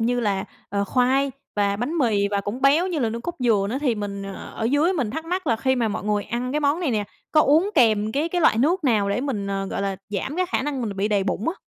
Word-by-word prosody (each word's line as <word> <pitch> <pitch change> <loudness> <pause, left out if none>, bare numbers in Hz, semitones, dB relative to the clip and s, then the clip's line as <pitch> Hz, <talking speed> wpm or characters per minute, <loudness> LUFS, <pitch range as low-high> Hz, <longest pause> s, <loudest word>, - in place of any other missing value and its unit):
như 245 +2 +1
là, 200 -3 0 0.2
ờ, 200 +1 -1
khoai 260 +4 +2 0.2
và 200 -1 +1
bánh 280 +10 -2
mì, 205 -6 +2
và 200 -1 0
cũng 205 +6 -5
béo 300 +7 +4
như 345 -5 -2
là 235 -4 +1
nước 230 +1 -4
cốt 345 +7 -4
dừa 220 -6 +2
nữa, 260 - -1
thì 255 -6 +1
mình 200 -1 -5 0.3
ở 225 - -3
dưới 290 +9 +3
mình 255 - -1
thắc 320 +5 -4
mắc 360 0 -3
là 230 - +2
khi 260 +3 +1
mà 235 -3 +1
mọi 205 - -4
người 210 -1 0
ăn 250 +2 -3
cái 300 - 0
món 290 +4 +1
này 310 -7 0
nè, 210 -2 0 0.3
có 305 - +6
uống 320 +9 +4
kèm 220 -5 +3
cái 300 +4 0
cái 355 0 -1
loại 225 - +4
nước 325 +5 +2
nào 210 -6 +2
để 205 - 0
mình, 235 -8 -2
ờ, 195 0 -2
gọi 200 - -3
là, 195 -1 -2
giảm 210 - -3
cái 365 0 +1
khả - - 0
năng 275 -3 -2
mình 205 -3 -4
bị 200 +2 0
đầy 200 -2 +1
bụng 205 - -1
á? 345 - -1
240 Hz, 285 wpm, -23 LUFS, 205-290 Hz, 0.3 s, có